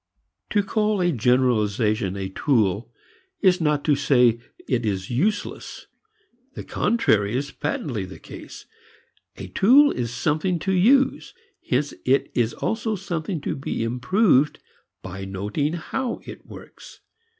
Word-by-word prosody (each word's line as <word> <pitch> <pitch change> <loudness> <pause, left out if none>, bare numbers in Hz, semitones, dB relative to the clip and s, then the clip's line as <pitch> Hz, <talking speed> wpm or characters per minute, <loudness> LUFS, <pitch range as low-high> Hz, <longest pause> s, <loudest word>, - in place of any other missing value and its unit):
To 205 -1 +2
call 210 0 0
a 175 -1 +2
generalization 110 - +1
a 95 -1 -3
tool 110 -1 0 0.5
is 185 -2 +4
not 150 -2 +1
to 150 - +4
say 125 -5 +3 0.3
it 125 -2 0
is 95 -2 -2
useless; 190 - -2 0.7
the - - -6
contrary 110 - +1
is 140 +1 -3
patently 125 -8 -3
the 95 - -10
case. - - -11 0.7
A - - -8
tool 275 +8 +5
is 120 -2 -3
something 155 +8 0
to 190 +4 -2
use. 255 +9 +3 0.3
Hence 140 +3 0
it 135 +1 +1
is 120 -2 +1
also 225 -1 -2
something 175 -3 -4
to - - -3
be 135 -4 -3
improved 140 - +2 0.5
by 95 +1 -7
noting 105 - -2
how 235 +9 -3
it - - -11
works. - - -13
140 Hz, 130 wpm, -23 LUFS, 115-185 Hz, 0.7 s, tool